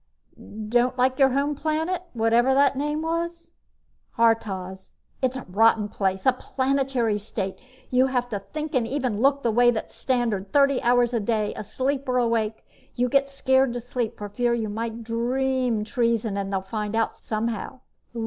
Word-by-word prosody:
"Don't 245 +3 +2
like 255 +1 +2
your 270 -1 +6
home 280 +3 0
planet, 315 +5 -1
whatever 235 +3 +3
the 280 -1 +5
name 295 +3 -2
was?" 335 +1 -3 0.7
"Haurtoz. 195 -5 0 0.3
It's 260 0 0
a 260 - -6
rotten 210 +2 +3
place. 190 -2 -1
A 260 - +5
Planetary 260 -4 0
State! 195 -2 -4 0.4
You 255 +1 +4
have 250 -2 -1
to 205 -4 -3
think 305 +9 -6
and 245 -4 +1
even 255 -5 -2
look 275 +1 +3
the 230 - +2
way 240 +2 +5
that's 230 -2 -2
standard 230 -7 -1
thirty 280 -2 +3
hours 245 0 +3
a 235 - +2
day, 215 -1 -1
asleep 270 +5 -3
or 250 - +2
awake. 230 -2 0 0.3
You 250 0 +1
get 275 +2 +2
scared 265 -2 +2
to 245 - -3
sleep 240 -1 -3
for 205 - -5
fear 235 +4 0
you 220 -2 -2
might 230 +2 -4
dream 245 0 0
treason 230 -3 0
and 200 -1 -3
they'd 190 -1 -2
find 210 +1 -3
out 225 0 0
somehow." 230 +3 -4
240 Hz, 170 wpm, -25 LUFS, 220-265 Hz, 0.7 s, your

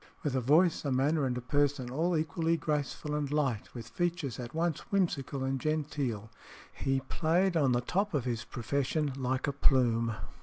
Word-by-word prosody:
With 145 -3 -1
a 130 - +1
voice, 155 +7 +4
a 140 - -1
manner, 140 +2 +2
and 125 -1 -1
a - - -3
person 135 0 0
all 165 +5 +1
equally 165 +1 0
graceful 150 -1 -2
and 150 -2 -1
light, 135 -8 0
with 115 -1 -7
features 170 -3 -2
at 125 +3 -7
once 165 -2 0
whimsical 145 -8 0
and 135 -1 -1
genteel, 145 -8 -2 0.4
he 135 0 0
played 170 +7 +1
on 140 -5 +3
the 120 0 +2
top 195 +8 0
of 135 -4 0
his 120 -2 -2
profession 140 +5 -1
like 130 -1 -1
a 140 - -1
plume. 115 -5 +2
140 Hz, 180 wpm, -31 LUFS, 125-155 Hz, 0.4 s, voice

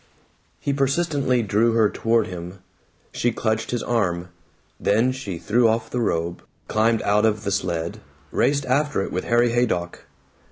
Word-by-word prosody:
He 140 - -1
persistently 140 -3 +1
drew 110 +3 +2
her 110 -2 +4
toward 115 +1 +1
him. 90 -1 -7 0.5
She 120 - 0
clutched 110 -1 -1
his 120 - -2
arm. 90 -7 -1 0.5
Then 115 +5 +2
she 130 -9 -5
threw 115 +7 +2
off 110 0 0
the 125 - -1
robe, 85 -5 -1 0.3
climbed 110 +1 +2
out 105 +1 +2
of 110 -1 +1
the 100 - -2
sled, 85 -3 -2 0.3
raced 140 0 +1
after 145 -4 +1
it - - -5
with 90 - -3
Harry 120 0 +3
Haydock. 110 -8 -1
110 Hz, 155 wpm, -23 LUFS, 100-125 Hz, 0.5 s, her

